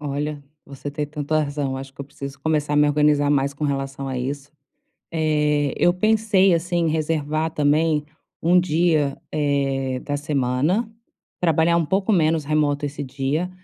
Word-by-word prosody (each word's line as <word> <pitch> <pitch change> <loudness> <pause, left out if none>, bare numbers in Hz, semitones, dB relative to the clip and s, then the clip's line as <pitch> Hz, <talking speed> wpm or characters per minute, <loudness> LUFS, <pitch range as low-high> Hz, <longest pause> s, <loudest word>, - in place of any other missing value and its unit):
Olha, 145 0 -3 0.2
você 140 +1 -7
tem 150 +1 -3
tanta 150 +1 -1
razão 145 -2 -2
acho 135 0 -8
que - - -11
eu - - -4
preciso 140 0 -9
começar 150 -2 0
a - - +2
me 150 0 +5
organizar 145 -1 +3
mais 140 -1 +1
com 150 - -4
relação 135 -1 -3
a 130 -1 -3
isso. 140 +3 -4 0.6
Eh, 150 -3 +1
eu 175 - +4
pensei, 205 -2 +3
assim, 170 0 0
em - - +2
reservar 155 0 -1
também 150 0 +2 0.4
1 175 +2 +4
dia, 160 -4 +1 0.2
eh, 135 -3 0
da 145 0 -3
semana, 145 - 0 0.5
trabalhar 165 0 +3
um 170 - +2
pouco 195 +4 +1
menos 160 -4 +2
remoto 145 -1 +1
esse 145 0 -5
dia, 140 +6 -2
150 Hz, 165 wpm, -22 LUFS, 140-160 Hz, 0.6 s, me